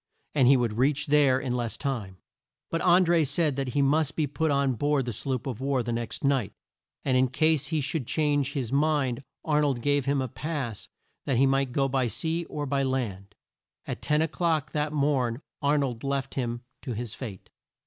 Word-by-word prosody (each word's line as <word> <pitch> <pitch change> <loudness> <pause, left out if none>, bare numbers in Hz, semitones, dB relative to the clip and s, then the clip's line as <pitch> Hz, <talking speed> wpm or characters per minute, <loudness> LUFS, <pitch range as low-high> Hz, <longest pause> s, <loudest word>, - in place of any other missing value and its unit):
And 135 -4 +4
he 135 +1 +7
would 115 -2 -1
reach 140 +3 +2
there 140 -3 +4
in 130 -2 -2
less 120 -2 -2
time. 115 -10 -3 0.5
But 165 - 0
An 180 +1 +5
dré 170 -1 +4
said 145 +1 +1
that 135 -2 -3
he 140 - +3
must 150 +1 +2
be 155 - +1
put 155 +3 -1
on 140 -2 +2
board 145 +2 +1
the 120 - -3
sloop 130 +3 -3
of 130 -3 -4
war 135 -2 +1
the 120 - -3
next 115 -1 -3
night; 135 -6 +1 0.5
and 130 - +2
in 130 0 +4
case 150 +2 +2
he 160 -3 0
should 140 -2 -2
change 145 -3 +1
his 130 -4 -3
mind 140 -4 +1 0.2
Ar 150 -1 +2
nold 140 -5 +1
gave 145 -2 +2
him 140 0 +1
a 130 - -1
pass 135 -5 -4 0.4
that 135 -4 +2
he 135 - +5
might 135 -1 +1
go 135 +1 +1
by 130 -2 +1
sea 165 +7 -2
or 150 -2 -4
by 140 0 0
land. 105 -7 -2 0.5
At - - -5
ten 150 +1 +2
o'clock 160 -3 0
that 150 0 -1
morn 140 -4 0 0.2
Ar 145 +1 +3
nold 125 -5 -2
left 135 -1 -2
him 120 -2 -2 0.2
to 125 - -4
his 115 0 -5
fate. 110 -8 -8
135 Hz, 205 wpm, -27 LUFS, 125-150 Hz, 0.5 s, he